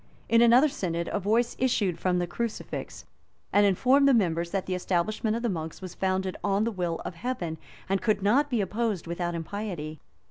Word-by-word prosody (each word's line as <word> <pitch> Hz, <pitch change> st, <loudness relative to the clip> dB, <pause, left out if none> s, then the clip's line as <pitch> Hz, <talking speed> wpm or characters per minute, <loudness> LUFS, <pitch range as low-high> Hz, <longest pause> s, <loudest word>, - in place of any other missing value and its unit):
In 230 Hz, 0 st, +5 dB
another 240 Hz, +5 st, +6 dB
synod, 170 Hz, -, -3 dB
a -, -, +1 dB
voice 225 Hz, +5 st, +1 dB
issued 205 Hz, -9 st, +1 dB
from 180 Hz, 0 st, +1 dB
the 175 Hz, -, +1 dB
crucifix, 225 Hz, +6 st, -5 dB, 0.5 s
and 205 Hz, 0 st, +5 dB
informed 260 Hz, +8 st, +4 dB
the 275 Hz, -, +6 dB
members 170 Hz, -5 st, +1 dB
that 195 Hz, +1 st, -2 dB
the 185 Hz, -, -2 dB
establishment 190 Hz, +5 st, 0 dB
of 235 Hz, -, -3 dB
the -, -, +2 dB
monks 160 Hz, -6 st, -4 dB
was 185 Hz, -2 st, -8 dB
founded 190 Hz, 0 st, -1 dB
on 200 Hz, +1 st, +2 dB
the 230 Hz, -, 0 dB
will 175 Hz, -5 st, -2 dB
of -, -, -4 dB
Heaven 170 Hz, -6 st, -4 dB, 0.3 s
and 195 Hz, 0 st, 0 dB
could 215 Hz, -4 st, +1 dB
not 270 Hz, +9 st, +3 dB
be 240 Hz, -5 st, +1 dB
opposed 210 Hz, -1 st, -1 dB
without 175 Hz, 0 st, -3 dB
impiety. 165 Hz, -3 st, -5 dB
195 Hz, 190 wpm, -27 LUFS, 175-230 Hz, 0.5 s, another